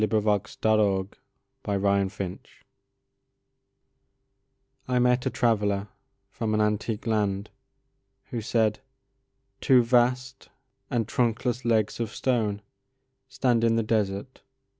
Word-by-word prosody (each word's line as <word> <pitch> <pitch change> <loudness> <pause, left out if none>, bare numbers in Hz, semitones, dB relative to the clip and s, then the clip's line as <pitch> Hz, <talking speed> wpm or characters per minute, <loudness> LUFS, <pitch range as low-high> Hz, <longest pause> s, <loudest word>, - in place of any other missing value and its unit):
Ozymandias 105 -2 0
of 100 -3 +2 1.1
Egypt 95 -2 -5 2.4
I 125 -1 0
MET 125 0 +2
a - - +2
traveller 105 -3 0 0.4
from 110 0 -2
an - - +1
antique 105 +1 -1
landWho 105 +2 -5
said:—Two 115 +3 -1
vast 125 +2 +1 0.4
and 115 -3 -1
trunkless 120 +1 0
legs 110 -2 +1
of 115 -2 -2
stoneStand 125 +3 -3
in 115 -1 +3
the 115 - +1
desert. 105 +2 -2
115 Hz, 85 wpm, -26 LUFS, 105-125 Hz, 2.4 s, in